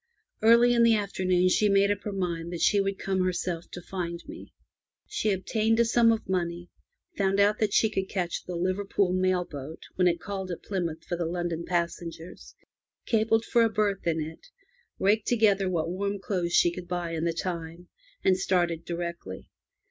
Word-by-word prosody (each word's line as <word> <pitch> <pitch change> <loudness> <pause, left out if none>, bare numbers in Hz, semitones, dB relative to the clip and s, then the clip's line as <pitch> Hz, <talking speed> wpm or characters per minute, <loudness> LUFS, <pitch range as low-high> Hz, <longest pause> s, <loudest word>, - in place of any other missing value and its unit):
Early 235 +2 +6
in 235 - +3
the 230 -1 +6
afternoon 185 -3 +1
she 210 +3 +3
made 200 0 +4
up 205 0 -2
her 210 - -2
mind 170 -3 -3
that 175 - -5
she 205 - +4
would 195 0 -2
come 190 -1 -1
herself 175 -2 -2
to 180 - -9
find 170 -2 -5
me. 320 +2 -10 0.5
She 215 - -1
obtained 220 +4 +1
a 235 - +5
sum 230 0 +4
of 225 -1 -2
money, 175 -1 -2 0.4
found 195 0 +1
out 205 +1 +3
that 215 -2 +1
she 220 - +4
could 195 -3 -3
catch 180 -3 -2
the 180 - -5
Liverpool 185 +1 0
mail 185 -1 +1
boat 145 +1 -8
when 180 -1 +4
it 170 -1 +1
called 190 +1 -5
at 175 - -6
Plymouth 170 -5 -3
for 175 - -3
the 170 -1 -2
London 170 -1 -3
passengers, 170 -1 -4 0.5
telegraphed 225 0 +2
for 240 - +3
a 230 - +4
berth 205 -3 -1
in 165 -1 +1
it, 160 - -7 0.5
raked 205 +2 +2
together 205 -5 +3
what 170 -2 -1
warm 200 +2 -2
clothes 180 -3 -2
she 175 - +5
could 175 0 -8
buy 175 -1 -3
in 165 -1 -2
the 170 - +1
time, 170 0 -5 0.4
and 185 -1 +4
started 175 -3 +1
directly. 170 - -6
185 Hz, 185 wpm, -27 LUFS, 170-205 Hz, 0.5 s, Early